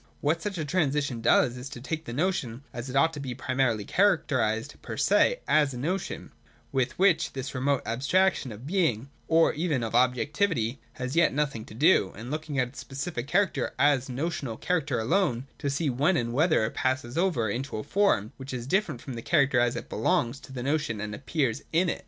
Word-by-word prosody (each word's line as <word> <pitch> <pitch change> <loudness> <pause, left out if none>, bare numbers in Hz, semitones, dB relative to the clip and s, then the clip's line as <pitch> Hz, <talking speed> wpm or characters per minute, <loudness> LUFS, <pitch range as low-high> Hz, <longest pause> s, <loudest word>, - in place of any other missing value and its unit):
Wliat 160 +3 +1
such 200 +1 -3
a 155 - -2
transition 145 -6 0
does, 120 +1 +3
is 125 +2 -7
to 125 - -8
take 155 +5 -4
the - - -6
notion, 140 -4 -1
as 125 +1 -6
it 130 - -6
ought 160 +4 +4
to 150 - -6
be 130 -3 -5
primarily 130 -5 0
characterised 140 - +1
per - - -6
se - - +3
as 145 -4 +3
a - - -5
notion, 175 +9 -3 0.4
with 130 -2 -1
which 190 -3 +3
this 135 0 -5
remote 135 +1 0
abstraction 140 - +1
of 110 +4 -10
being, 145 - 0 0.2
or 165 0 +4
even 150 -6 -1
of 115 - -4
objectivity, 130 - +1
has 130 0 -4
as - - -4
yet 165 -5 +4
nothing 135 -7 -1
to - - -12
do, 140 - +4
and 120 +5 -8
looking 155 -2 -4
at 125 -2 +1
its 135 - -11
specific 135 -1 -5
character 195 +5 +1
as 140 -3 +3
a - - -4
notional 135 -4 -3
character 150 -8 0
alone, 125 - +1
to 145 - -1
see 145 +3 -1
when 145 +8 +2
and 120 -3 -1
whether 155 -3 +3
it 110 - -4
passes 130 -1 -1
over 165 -10 +1
into 125 +4 -3
a 110 - -4
form 195 - +1
which 130 -1 -6
is 120 -1 -5
different 155 - 0
from 135 - -7
the 115 - -6
character 140 -3 +3
as 120 0 +2
it 115 - -5
belongs 120 +4 0
to 135 - -14
the 125 -2 -5
notion 140 -6 -1
and 105 0 -4
appears 135 -1 -1
in 175 +2 +2
it. - - -2
135 Hz, 210 wpm, -27 LUFS, 120-160 Hz, 0.4 s, ought